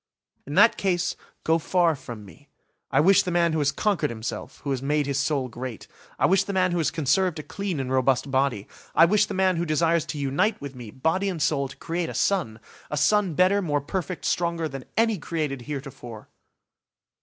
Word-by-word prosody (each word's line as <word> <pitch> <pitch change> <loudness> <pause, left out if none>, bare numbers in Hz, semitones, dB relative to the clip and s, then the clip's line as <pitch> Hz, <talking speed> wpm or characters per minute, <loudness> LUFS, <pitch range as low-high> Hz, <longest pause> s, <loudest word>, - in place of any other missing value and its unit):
"In 145 - -5
that 215 +4 +6
case 180 -2 0 0.3
go 165 +1 +2
far 170 0 +2
from 115 -6 -9
me. 145 +9 -16 0.4
I 135 - +2
wish 190 +6 +6
the - - -4
man 170 -2 +2
who 160 - 0
has 145 -1 +2
conquered 205 -3 0
himself, 115 0 -6
who 140 - -2
has 130 -2 -1
made 145 +1 +1
his 140 0 -1
soul 140 -2 0
great. 125 -1 -7 0.3
I - - +3
wish 190 +1 +4
the 200 - -5
man 185 -1 +2
who 175 - 0
has 155 -3 +2
conserved 160 +4 +1
a 155 - -5
clean 195 -4 -4
and 130 -1 -3
robust 130 +1 +1
body. 130 -6 0 0.3
I 165 - +8
wish 210 +4 +3
the 200 - -5
man 185 -2 +2
who 170 - 0
desires 165 0 +1
to - - -4
unite 145 +10 0
with 140 -1 -7
me, 120 -4 -9
body 160 - 0
and 180 -4 -4
soul, 145 -2 +1
to 140 - -13
create 165 +3 -3
a - - -7
son! 165 - 0 0.3
A 150 - -3
son 185 +3 +2
better, 185 +4 +4
more 145 -5 0
perfect, 180 +5 -4
stronger, 170 -2 0
than 135 -3 -8
any 225 -3 +2
created 150 -4 -3
heretofore!" 130 -6 -7
155 Hz, 210 wpm, -25 LUFS, 135-180 Hz, 0.4 s, I